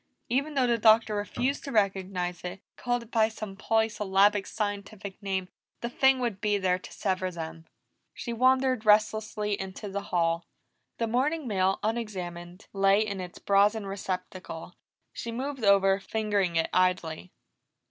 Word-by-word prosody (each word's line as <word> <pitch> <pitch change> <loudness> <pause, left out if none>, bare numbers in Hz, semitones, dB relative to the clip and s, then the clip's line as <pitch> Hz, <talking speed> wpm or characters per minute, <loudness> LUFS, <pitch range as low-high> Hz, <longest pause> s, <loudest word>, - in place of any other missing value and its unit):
Even 280 +5 0
though 265 -2 +3
the 235 -1 +2
Doctor 220 0 +5
refused 245 +6 -1
to 280 - -5
recognize 190 -4 0
it, 180 +2 -5 0.2
called 245 -1 -1
it 235 - -18
by 220 -1 +3
some 215 -3 -7
polysyllabic 205 -2 +2
scientific 205 -1 -5
name, 190 -2 -2 0.3
the 235 - -3
thing 265 +1 +4
would 235 -6 -2
be 205 -1 +2
there 185 -2 +1
to - - -12
sever 185 -2 -1
them. 165 -1 -7 0.5
She 235 - -4
wandered 255 0 +3
restlessly 210 -1 +2
into 190 +2 -6
the 200 +1 -3
hall. 170 -1 +1 0.5
The 230 - 0
morning 265 +6 0
mail, 190 -2 +1
unexamined, 185 -5 -4
lay 195 +1 +4
in 200 -3 -4
its 180 -1 -8
brazen 205 +2 +3
receptacle, 185 -3 -5 0.4
she 235 - -5
moved 265 +1 -4
over, 195 -1 +5
fingering 205 -4 -1
it 165 - +1
idly. 180 -2 +1
205 Hz, 145 wpm, -28 LUFS, 185-225 Hz, 0.5 s, Doctor